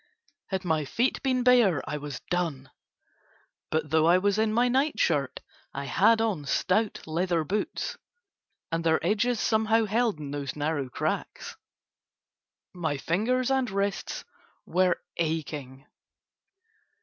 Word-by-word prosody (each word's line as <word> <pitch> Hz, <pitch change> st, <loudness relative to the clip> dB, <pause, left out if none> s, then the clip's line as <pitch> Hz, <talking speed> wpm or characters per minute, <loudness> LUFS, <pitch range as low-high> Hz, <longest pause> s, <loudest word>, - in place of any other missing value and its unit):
Had 190 Hz, -1 st, -3 dB
my 160 Hz, -3 st, +1 dB
feet 235 Hz, -, 0 dB
been 255 Hz, -2 st, +1 dB
bare 240 Hz, -, +4 dB
I 150 Hz, -, -2 dB
was 145 Hz, -2 st, -6 dB
done, 160 Hz, -7 st, -2 dB, 1.0 s
but 155 Hz, -1 st, -1 dB
though 160 Hz, 0 st, +4 dB
I 175 Hz, +2 st, +6 dB
was 200 Hz, +2 st, +1 dB
in 220 Hz, 0 st, +2 dB
my 240 Hz, +3 st, +3 dB
night 265 Hz, 0 st, +1 dB
shirt 145 Hz, -5 st, +1 dB, 0.3 s
I 140 Hz, +1 st, -3 dB
had 220 Hz, +9 st, +4 dB
on 210 Hz, -10 st, -1 dB
stout 200 Hz, +9 st, 0 dB
leather 170 Hz, +1 st, 0 dB
boots, 205 Hz, +7 st, -3 dB, 0.7 s
and 165 Hz, 0 st, -1 dB
their 160 Hz, -1 st, +3 dB
edges 220 Hz, +5 st, +1 dB
somehow 220 Hz, 0 st, +2 dB
held 225 Hz, -2 st, +1 dB
in 145 Hz, -2 st, -6 dB
those 140 Hz, -2 st, -4 dB
narrow 145 Hz, -2 st, -2 dB
cracks. -, -, -3 dB, 1.2 s
My 160 Hz, -5 st, -2 dB
fingers 240 Hz, -, 0 dB
and 265 Hz, -2 st, +1 dB
wrists 200 Hz, 0 st, -2 dB, 0.4 s
were 180 Hz, -1 st, +2 dB, 0.2 s
aching. 150 Hz, -4 st, -3 dB
180 Hz, 130 wpm, -27 LUFS, 155-220 Hz, 1.2 s, I